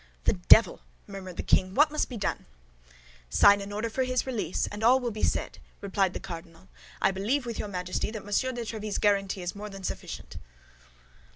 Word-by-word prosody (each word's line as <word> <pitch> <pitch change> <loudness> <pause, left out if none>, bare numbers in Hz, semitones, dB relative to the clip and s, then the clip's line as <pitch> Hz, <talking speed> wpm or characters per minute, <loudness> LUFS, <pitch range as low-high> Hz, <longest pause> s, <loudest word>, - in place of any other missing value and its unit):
"The - - +3
devil!" 195 +5 +5 0.2
murmured 190 -3 -9
the - - -3
king; 185 +1 +2
"what 300 +1 +5
must 305 - -1
be 245 - -6
done?" 200 - -3 0.8
"Sign 200 - +6
an 200 +1 -7
order 210 +3 -2
for 245 +4 -1
his 255 0 0
release, 225 -9 -1
and 205 +1 -6
all 250 +3 +6
will 245 -2 -2
be 215 - -6
said," - - -1 0.2
replied 195 -2 0
the - - -3
cardinal. 165 +1 -10 0.3
"I 195 - +3
believe 225 +8 -1
with 235 -2 -5
your - - -3
Majesty 180 0 -3
that 215 -2 -7
Monsieur 205 +6 0
de 240 -1 -5
Tréville's 215 -2 -4
guarantee 195 -2 +1
is 175 - -3
more 210 +1 -7
than 195 -1 -10
sufficient." - - -6
205 Hz, 195 wpm, -28 LUFS, 190-230 Hz, 0.8 s, Sign